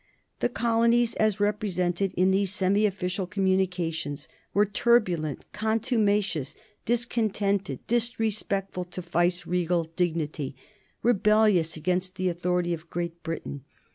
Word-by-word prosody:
The - - +1
colonies, 235 0 +2
as 215 -2 +2
represented 195 -3 0
in 185 +1 +4
these 195 0 +2
semi 200 +2 +2
official 185 -1 -3
communications, 180 -6 -1 0.2
were 205 +1 +3
turbulent, 200 - +1
contumacious, 210 - 0 0.3
discontented, 210 - 0
disrespectful 220 -5 -1
to 180 +1 -7
viceregal 175 0 +1
dignity, 155 -6 -1 0.5
rebellious 210 -7 +3
against 185 +3 -1
the 185 0 0
authority 175 0 0
of 165 0 -7
Great 170 0 -4
Britain. 160 -5 -5
185 Hz, 105 wpm, -27 LUFS, 175-210 Hz, 0.5 s, in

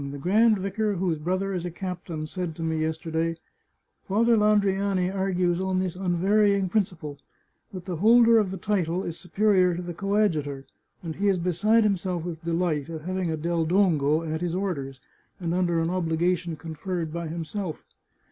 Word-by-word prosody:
The 145 - -6
grand 215 +8 +3
vicar 200 +2 -1
whose 175 -4 -1
brother 185 +5 -1
is 180 -2 -2
a 175 - -3
captain 175 -3 -5
said 175 0 -4
to 165 - -5
me, 160 -1 -1
yesterday, 160 +1 -2 0.3
' - - -46
Father 230 +4 +3
Landriani 200 -3 +2
argues 185 -2 0
on 190 -1 0
this 185 -2 -1
unvarying 195 +2 +2
principle, 175 -8 -2 0.5
that 185 -2 -8
the 180 -3 -4
holder 230 +4 +6
of 205 -3 0
the 190 - -5
title 185 -2 -1
is 170 -1 -5
superior 185 -2 +2
to 175 - -4
the 175 0 -5
coadjutor, 165 -8 0 0.4
and 160 -2 -5
he 200 +2 +1
is 195 -2 +3
beside 205 +6 +2
himself 185 -4 -1
with 165 -2 -6
delight 165 -3 -1
at 160 -2 -6
having 185 +1 -2
a 160 - -1
Del 170 +1 0
Dongo 160 -4 +2
at 160 0 -3
his 175 -1 -1
orders, 140 -9 -3 0.4
and 170 -2 -2
under 175 -2 +1
an 165 +1 0
obligation 175 0 0
conferred 165 +1 -5
by 170 -1 -3
himself. 170 +2 -5
180 Hz, 175 wpm, -26 LUFS, 165-195 Hz, 0.5 s, holder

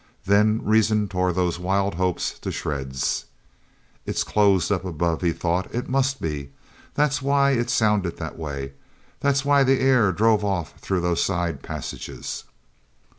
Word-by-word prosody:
Then 105 +3 +3
reason 110 -1 +3
tore 90 -1 0
those 90 -1 -1
wild 95 +2 0
hopes 90 0 -1
to - - -4
shreds. 65 -3 -2 0.8
"It's - - -1
closed 100 -3 +2
up 95 -2 0
above," 85 -2 -1
he 85 -2 +2
thought. 90 +3 -1
"It 120 - -2
must 135 0 +1
be. 75 -3 -4 0.5
That's 145 -1 +1
why 140 0 +3
it 120 -2 0
sounded 105 -7 +1
that 80 -2 -6
way. 70 -4 -5 0.5
That's 140 -1 +1
why 140 -1 +5
the 135 0 +3
air 130 -7 +4
drove 105 +3 +3
off 95 -5 -2
through 95 -2 -1
those 85 -1 +1
side 85 -3 -1
passages." - - -6
100 Hz, 150 wpm, -24 LUFS, 85-120 Hz, 0.8 s, why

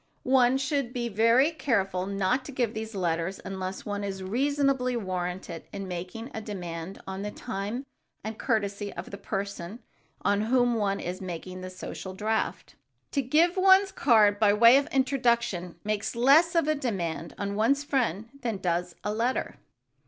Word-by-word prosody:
One 255 0 +4
should 270 -2 -1
be 240 -2 -2
very 230 +8 +4
careful 195 - 0
not 200 +6 0
to - - -7
give 245 -4 -1
these 220 0 -5
letters 170 0 -1
unless 190 0 -5
one 205 -1 -3
is 190 -1 -4
reasonably 265 +3 +1
warranted 180 -4 -4
in 195 -1 -5
making 185 +8 -6
a 220 - -4
demand 180 -3 -6
on 190 0 -5
the 205 - -3
time 210 +6 -4 0.4
and 220 +1 -4
courtesy 205 -4 -1
of - - -7
the 200 - -7
person 200 -1 -4 0.5
on 200 0 +2
whom 245 +2 +3
one 205 -3 0
is 180 +2 -5
making 185 0 -6
the 185 - -6
social 185 0 -7
draft. 220 +3 -2 0.4
To 280 - +1
give 315 +7 +3
one's 385 +1 +6
card 210 -6 +4
by 210 -2 +5
way 230 +4 +7
of 280 +1 +1
introduction 240 - +1
makes 215 +1 -2
less 290 +8 +5
of 330 -3 +3
a 310 - +3
demand 180 - -3
on 200 0 -3
one's 240 +7 +2
friend 230 - 0
than 230 -4 -2
does 175 -1 -1
a 210 - -1
letter. 235 +4 -1
215 Hz, 165 wpm, -28 LUFS, 190-255 Hz, 0.5 s, way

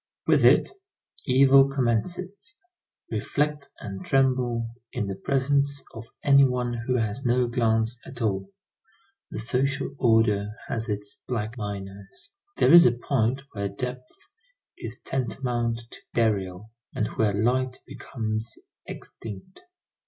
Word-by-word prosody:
With - - +4
it, - - +5 0.6
evil 135 +1 +6
commences. 180 - -2 0.6
Reflect 150 -1 -1
and 95 -1 -7
tremble 125 -3 +1 0.2
in 120 -4 -2
the 100 - -3
presence 140 +6 +1
of 115 0 -9 0.2
any 140 -1 +6
one 125 -2 +1
who 120 +2 -2
has 115 +2 -1
no 125 +1 +2
glance 115 -1 +1
at 130 - -10
all. 110 - -1 0.8
The - - -7
social 135 +5 -1
order 110 -3 +3
has 115 -1 -3
its 105 0 -3
black 115 -2 -3
miners. 100 -2 -7 0.3
There - - +5
is 170 -4 +10
a 120 - +3
point 130 +1 0
where 100 -2 -3
depth 125 +5 -6 0.6
is - - -7
tantamount 120 -2 -2
to - - -11
burial, 105 -3 0 0.2
and 105 - 0
where 105 -2 +1
light 125 +4 +1
becomes 110 -3 -4 0.3
extinct. 115 - -9
120 Hz, 125 wpm, -26 LUFS, 110-135 Hz, 0.8 s, is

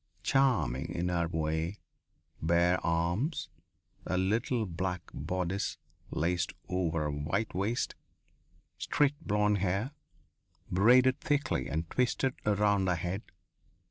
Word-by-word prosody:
Charming, 95 - +2
in 90 +1 0
her 85 -1 +1
way. 80 +3 -1 0.6
Bare 85 +2 +3
arms. 85 - 0 0.6
A 90 - 0
little 110 +5 +1
black 90 -1 -3
bodice 95 +2 -2 0.3
laced 85 +1 0
over 85 -4 0
a 75 - -1
white 80 +10 -2
waist. 100 +6 -1 0.9
Straight 145 0 +1
blonde 105 0 +2
hair, 100 +7 0 0.8
braided 125 +8 +5
thickly 145 - 0
and 80 +2 -2
twisted 125 +1 +1
around 100 -2 +3
her 90 - +2
head. 90 +4 -3
95 Hz, 110 wpm, -31 LUFS, 85-110 Hz, 0.9 s, braided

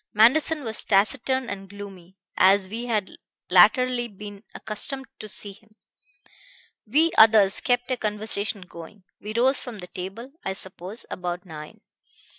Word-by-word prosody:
Manderson 290 +8 +4
was 220 -2 -2
taciturn 255 +5 +1
and 195 -1 -7
gloomy, 195 -2 -11 0.2
as 190 +1 +4
we 230 +4 -5
had 215 -5 -1 0.4
latterly 240 +6 +5
been 205 -1 -11
accustomed 265 +6 -3
to 215 - -8
see 205 0 -1
him. 215 +1 -24 1.1
We 310 +9 +3
others 215 -3 +6
kept 245 +1 0
a 255 - 0
conversation 210 -2 -1
going. 180 +2 -12 0.2
We 210 +1 -6
rose 260 +3 +3
from 245 -4 -8
the 180 - -8
table, 195 +8 -8
I 190 - -2
suppose, 190 +2 -4
about 180 +1 -4
nine. 155 -3 -10
210 Hz, 140 wpm, -24 LUFS, 190-240 Hz, 1.1 s, others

